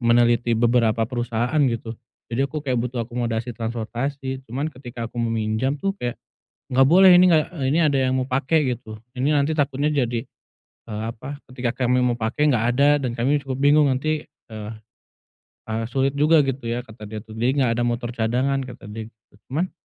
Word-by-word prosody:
meneliti 120 -1 +3
beberapa 115 -1 +2
perusahaan 120 +4 -1
gitu. 115 -1 -4 0.4
Jadi 115 - 0
aku 155 +2 -4
kayak 130 -3 0
butuh 120 -1 -2
akomodasi 120 0 -3
transportasi. 120 +4 -4
Cuman 140 +7 -2
ketika 125 -3 -7
aku - - -18
meminjam 115 +3 0
tuh 195 - 0
kayak, 120 -1 -3 0.6
"Enggak 130 +1 +5
boleh, 185 +4 +7
ini 180 +1 +7
enggak 155 -2 +4
eee, 140 - -2
ini 160 - +3
ada 145 -3 +3
yang 130 0 +1
mau - - 0
pake," 135 +4 +1 0.2
gitu, 110 -2 -11 0.2
"ini 135 +4 +1
nanti 145 +2 +2
takutnya 145 0 0
jadi, 120 -5 0 0.7
eee, 105 -1 -4
apa, 140 +5 -8
ketika 125 -2 -2
kami 125 +1 +3
mau 125 - +2
pake 120 +6 0
enggak 115 -3 +1
ada, 145 +2 +4
dan 125 -3 -2
kami 135 +5 +1
cukup 135 -2 -4
bingung 145 +1 +5
nanti, 155 +4 -2
e 110 - -15 1.1
e 110 - -5 0.2
sulit 135 +2 +1
juga 155 +1 +5
gitu 135 -2 -3
ya," 120 +1 -2
kata 110 -1 -11
dia 110 0 -7
tuh. 110 -1 -12
Dia 120 +3 +2
enggak 135 -4 +2
ada - - +2
motor 120 0 -2
cadangan, 125 +4 0
kata 125 -3 -11
dia 110 +1 -6
gitu. 105 -3 -39 0.2
Cuman, 165 +7 -1
125 Hz, 185 wpm, -23 LUFS, 115-140 Hz, 1.1 s, boleh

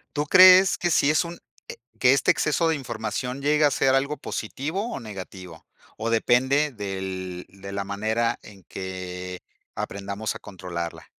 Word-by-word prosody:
¿Tú 145 - 0
crees 185 +3 +8
que 175 - 0
sí 145 - +3
es 155 - +3
un 170 0 -8 0.3
e - - -7 0.2
que 125 0 +5
este 135 - +3
exceso 155 +2 +1
de 160 - +2
información 125 0 -4
llegue 150 +2 +2
a 145 - +5
ser 135 0 +2
algo 140 +3 0
positivo 160 - -4
o - - -4
negativo? 95 - -9 0.3
¿O 110 +1 -3
depende 130 +6 +2
del 95 -3 -5
de 100 +1 -11
la 100 0 -3
manera 110 +4 -1
en 100 -3 -15
que 90 -1 -6 0.3
aprendamos 100 +2 -4
a - - -8
controlarla? 90 -4 -6
110 Hz, 160 wpm, -25 LUFS, 95-145 Hz, 0.3 s, crees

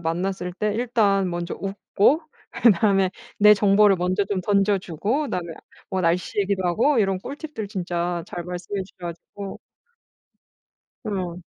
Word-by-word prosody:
만났을 180 +2 -2
때 210 +2 -1
일단 210 -5 +2
먼저 175 0 -3
웃고 200 +9 +1 0.3
그다음에 195 -4 +3 0.3
내 210 0 +8
정보를 205 0 +5
먼저 185 +3 0
좀 195 -1 -2
던져 200 +1 +2
주고 200 - -2
그다음에 180 - -4 0.4
뭐 190 - -1
날씨 175 +1 0
얘기도 195 -1 0
하고 235 - +2
이런 195 -3 +2
꿀팁들 280 - -7
진짜 175 -3 -2
잘 175 - -6
말씀해 180 +3 -4
주셔 190 - -16
가지고 190 +4 -8 1.4
어. 185 -5 -3
195 Hz, 280 characters per minute, -23 LUFS, 180-210 Hz, 1.4 s, 내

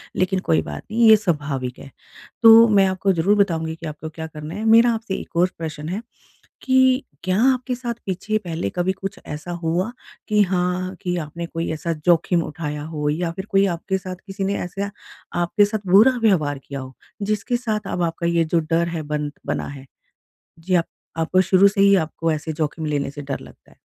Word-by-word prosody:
लेकिन 185 +1 +1
कोई 80 0 +3
बात 75 -2 -7
नहीं, 230 +1 +4
ये 220 - +10
स्वाभाविक 145 - -2
है। 135 - -11 0.5
तो 225 0 +9
मैं 200 -3 +4
आपको 190 +1 +1
ज़रूर 180 +4 +2
बताऊँगी 165 -5 +1
कि 165 - -10
आपको 155 +1 -7
क्या 160 0 -7
करना 155 +1 -8
है। 210 - -4
मेरा 230 +2 +6
आपसे 225 -3 -3
एक - - -8
और 180 +2 +4
प्रश्न 155 -2 -5
है 195 +5 -3 0.6
कि 260 0 +3 0.2
क्या 185 +1 +1
आपके 255 0 -2
साथ 240 -1 -4
पीछे 200 +3 -1
पहले 165 - -3
कभी 175 - 0
कुछ 195 +1 -6
ऐसा 150 +4 -6
हुआ 175 +7 0 0.4
कि 210 -1 +4
हाँ, 185 0 -1
कि 180 -1 -1
आपने 170 +1 -5
कोई 165 0 -4
ऐसा 165 +2 -3
जोखिम 170 0 +3
उठाया 150 -2 -5
हो? 150 -1 -3
या 165 +3 -1
फिर 190 +3 -7
कोई 195 -1 +4
आपके 190 +3 -2
साथ 185 -1 -7
किसी 195 0 -4
ने 200 +1 0
ऐसा 200 +3 -4 0.5
आपके 205 +5 +3
साथ 205 -1 -3
बुरा 230 +7 +7
व्यवहार 155 -10 +2
किया 140 -1 -6
हो 130 0 -9 0.3
जिसके 210 +4 0
साथ 215 -4 -3
अब 180 - -1
आपका 170 0 -1
ये 170 -1 +2
जो 165 +2 +1
डर 165 +2 0
है 165 -2 -3
बन 150 -1 -1 0.2
बना - - -2
है? 140 -1 -10 0.7
जी 185 +3 0
आप 170 -1 +2 0.3
आपको 165 +3 +2
शुरू 190 +2 +5
से 200 0 +1
ही 200 0 +6
आपको 165 -1 -1
ऐसे 155 +1 -3
जोखिम 155 +1 -3
लेने 145 -2 -1
से 145 +1 -8
डर 135 -1 -4
लगता - - -16
है? - - -23
175 Hz, 205 wpm, -22 LUFS, 160-200 Hz, 0.7 s, ये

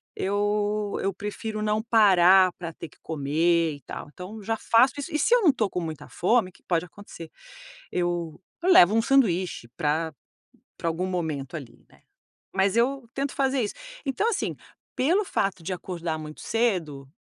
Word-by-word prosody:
eu 205 +1 0
eu 195 - 0
prefiro 210 +2 -5
não 215 0 +1
parar 190 -5 +5
pra 170 -2 -5
ter 165 - -9
que - - -24
comer, 160 +2 +1
e 145 - -15
tal. - - -8
Então 185 +4 -9
eu 210 - -10
já 225 +2 -1
faço 235 +4 +4
isso. 310 +4 -5
E 305 - 0
se 470 - +2
eu - - +5
não 355 - +5
estou 240 -6 +2
com 180 - -3
muita 155 -3 -6
fome, 215 +1 +1
o - - -19
que - - -23
pode 170 -1 0
acontecer, 175 -3 -12 0.6
eu 175 -2 -2 0.2
eu 370 - +4
levo 195 - +7
um 225 - +3
sanduíche 190 - +1
pra 155 +1 -1 0.6
pra 170 - -1
algum 170 +3 -1
momento 160 -6 -3
ali, 140 -7 -9
né. - - -23 0.5
Mas 195 +1 +2
eu 245 +1 +1
tento 275 0 -2
fazer 270 -1 +1
isso. 205 - -3 0.3
Então 275 - 0
assim, 435 - -1 0.4
pelo 345 +11 +3
fato 195 - -1
de 185 - -4
acordar 170 -3 -4
muito 155 -1 -9
cedo, 175 - -1
190 Hz, 180 wpm, -26 LUFS, 165-225 Hz, 0.6 s, levo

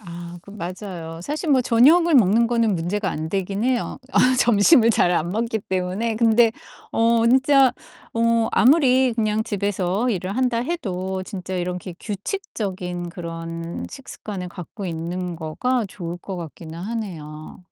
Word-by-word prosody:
아 175 -2 -9
그 200 - -14
맞아요. 175 -3 -7
사실 300 - -3
뭐 265 -2 +5
저녁을 300 +9 +5
먹는 230 0 +5
거는 230 -4 +1
문제가 185 +4 -2
안 155 +1 -4
되긴 195 +3 -2
해요, 255 0 -1
아 - - +3 0.2
점심을 230 +2 +5
잘 180 -5 +3
안 170 +2 -3
먹기 225 +3 -1
때문에. 190 +3 -2
근데 230 0 +4 0.4
어 230 0 +3
진짜 265 +1 +5 0.4
어 230 0 +2
아무리 260 -2 +4
그냥 215 -1 0
집에서 200 +1 -1
일을 190 +1 -3
한다 250 -3 +1
해도 190 - -3
진짜 185 -1 -6
이렇게 180 0 -4
규칙적인 190 - -4
그런 165 -1 -6
식습관을 205 -8 -7
갖고 180 +3 -8
있는 175 +2 -4
거가 205 +9 -1
좋을 175 -2 -6
것 190 +1 -7
같기는 165 0 -8
하네요. 175 -8 -6
200 Hz, 285 characters per minute, -22 LUFS, 175-235 Hz, 0.4 s, 뭐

